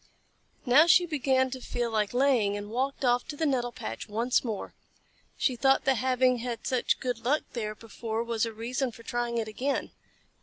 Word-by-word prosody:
Now 280 Hz, +6 st, +6 dB
she 350 Hz, +2 st, +6 dB
began 265 Hz, -5 st, +1 dB
to 260 Hz, 0 st, -6 dB
feel 240 Hz, -1 st, -2 dB
like 210 Hz, -2 st, 0 dB
laying, 245 Hz, -6 st, +2 dB
and 205 Hz, +1 st, -7 dB
walked 265 Hz, +3 st, -1 dB
off 245 Hz, 0 st, +2 dB
to 295 Hz, -, -6 dB
the 320 Hz, -, 0 dB
nettle 250 Hz, -4 st, 0 dB
patch 115 Hz, -, -7 dB
once 230 Hz, +4 st, +1 dB
more. 220 Hz, -5 st, -4 dB, 0.6 s
She 255 Hz, -, +1 dB
thought 270 Hz, +3 st, +3 dB
that 270 Hz, -, +4 dB
having 255 Hz, 0 st, +2 dB
had 235 Hz, -1 st, -5 dB
such 255 Hz, -2 st, +1 dB
good 250 Hz, -3 st, -2 dB
luck 285 Hz, +6 st, +1 dB
there 215 Hz, -3 st, -3 dB
before 225 Hz, +1 st, -4 dB
was 230 Hz, -1 st, -1 dB
a 230 Hz, -, 0 dB
reason 245 Hz, +4 st, -2 dB
for 230 Hz, -, -14 dB
trying 240 Hz, 0 st, -2 dB
it 225 Hz, -1 st, -1 dB
again. 260 Hz, +6 st, -2 dB
245 Hz, 190 wpm, -28 LUFS, 225-265 Hz, 0.6 s, Now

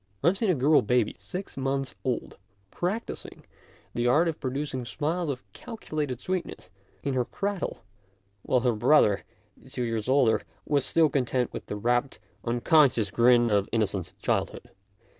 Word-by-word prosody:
I -, -, +4 dB
have 190 Hz, -, 0 dB
seen 220 Hz, -, +1 dB
a 180 Hz, -, +4 dB
girl 145 Hz, +3 st, +4 dB
baby, 120 Hz, 0 st, +1 dB
six 190 Hz, +1 st, -6 dB
months 135 Hz, 0 st, -1 dB
old, 125 Hz, -2 st, -3 dB, 0.3 s
practising 200 Hz, +7 st, -4 dB, 0.5 s
the 120 Hz, 0 st, 0 dB
art 155 Hz, +8 st, +4 dB
of 160 Hz, -2 st, -2 dB
producing 130 Hz, -1 st, -3 dB
smiles 155 Hz, +7 st, -2 dB
of 130 Hz, -6 st, -4 dB
calculated 155 Hz, -, -4 dB
sweetness 175 Hz, -, -4 dB, 0.3 s
in 140 Hz, -, -1 dB
her 125 Hz, -1 st, +2 dB
cradle, 200 Hz, -, -4 dB, 0.6 s
while 125 Hz, +4 st, +1 dB
her 125 Hz, -1 st, +2 dB
brother, 105 Hz, -3 st, +4 dB, 0.5 s
two 125 Hz, -1 st, -3 dB
years 115 Hz, 0 st, -2 dB
older, 130 Hz, -4 st, +4 dB, 0.2 s
was 145 Hz, -3 st, +1 dB
still 165 Hz, -1 st, +4 dB
content 125 Hz, -2 st, 0 dB
with -, -, -7 dB
the -, -, -4 dB
rapt, 120 Hz, +5 st, 0 dB, 0.3 s
un 120 Hz, 0 st, -1 dB
conscious 130 Hz, -11 st, +4 dB
grins 120 Hz, -1 st, +4 dB
of 100 Hz, -1 st, +2 dB
innocent 100 Hz, -5 st, -1 dB
childhood. -, -, -2 dB
130 Hz, 155 wpm, -27 LUFS, 120-155 Hz, 0.6 s, I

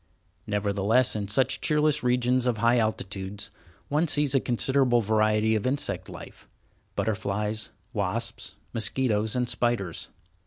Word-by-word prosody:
Nevertheless, 105 Hz, +4 st, +2 dB
in 105 Hz, -2 st, -2 dB
such 125 Hz, +6 st, +1 dB
cheerless 150 Hz, -1 st, +2 dB
regions 125 Hz, 0 st, +2 dB
of 120 Hz, -3 st, +1 dB
high 115 Hz, +2 st, +3 dB
altitudes, 100 Hz, -2 st, -3 dB, 0.4 s
one 150 Hz, +4 st, +1 dB
sees 145 Hz, -2 st, +2 dB
a 135 Hz, -, +5 dB
considerable 125 Hz, 0 st, +2 dB
variety 110 Hz, 0 st, +2 dB
of 110 Hz, +2 st, 0 dB
insect 140 Hz, +2 st, -2 dB
life—butterflies, 105 Hz, -, -5 dB, 0.2 s
wasps, 105 Hz, 0 st, -3 dB, 0.2 s
mosquitoes, 110 Hz, -1 st, 0 dB
and 125 Hz, -1 st, 0 dB
spiders. 120 Hz, -9 st, -1 dB
110 Hz, 115 wpm, -27 LUFS, 105-125 Hz, 0.4 s, a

